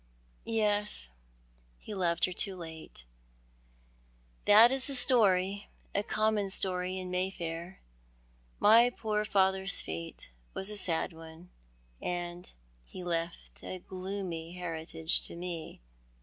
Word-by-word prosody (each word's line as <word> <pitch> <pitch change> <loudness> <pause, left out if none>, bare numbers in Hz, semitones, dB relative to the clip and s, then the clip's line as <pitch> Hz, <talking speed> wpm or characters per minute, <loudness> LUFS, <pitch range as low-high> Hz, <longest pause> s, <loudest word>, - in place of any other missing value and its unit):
" - - -34 0.2
Yes, 205 - +1 0.7
he 210 - -8
loved 175 -4 +2
her 185 - -4
too 195 +1 -1
late. 160 - -9 1.4
That 220 +4 +8
is 265 -1 +1
the 280 - 0
story, 200 -6 +3 0.3
a 200 - +1
common 215 -1 0
story 185 -1 0
in 185 -1 -5
Mayfair. 180 -1 -4 0.8
My 230 +3 +7
poor 215 -3 -2
fathers 190 -1 +3
fate 80 -5 -6 0.2
was 190 +2 +5
a - - -3
sad 170 -4 +1
one— 165 +2 -13 0.5
and 175 0 -4 0.3
he 180 - -9
left 170 -1 -4
a 185 - -6
glcomy 185 -3 -5
heritage 165 -2 -2
to - - -8
me." 170 - -6
185 Hz, 120 wpm, -31 LUFS, 170-205 Hz, 1.4 s, That